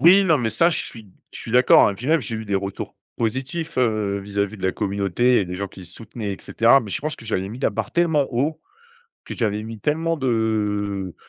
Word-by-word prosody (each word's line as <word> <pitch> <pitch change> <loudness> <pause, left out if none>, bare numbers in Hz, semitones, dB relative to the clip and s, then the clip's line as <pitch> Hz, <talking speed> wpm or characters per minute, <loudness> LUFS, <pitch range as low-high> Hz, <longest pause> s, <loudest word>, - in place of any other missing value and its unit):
Oui, 190 +4 +7
non, 160 -5 +4
mais 115 -3 -1
ça, 165 +11 +3
je 165 - -1
suis 110 -4 -10 0.2
je - - -9
suis - - -7
d’accord 125 -4 +6
et - - -5
puis 115 +7 -8
même 160 +1 +3
j’ai 115 - -4
eu 110 - -4
des 100 - -1
retours 100 0 -4 0.2
positifs, 135 +8 -2
heu, 110 -5 +1
vis-à-vis 100 +1 -2
de - - -13
la 95 - +1
communauté 100 +4 +1
et - - 0
des 90 0 -6
gens 100 +1 -4
qui 95 -1 -12
soutenaient 105 +3 -6
et - - -5
cetera. 120 +4 +4
Mais 105 -5 -8
je - - -2
pense 155 +1 -3
que 115 - -13
j’avais 95 -3 -1
mis 115 +4 -8
la 135 - +2
barre - - -4
tellement 160 -5 +2
haut, 145 +6 0 0.7
que - - -6
j’avais 105 -2 -1
mis 110 0 -7
tellement 165 +6 0
de 105 - -1
110 Hz, 235 wpm, -22 LUFS, 100-135 Hz, 0.7 s, Oui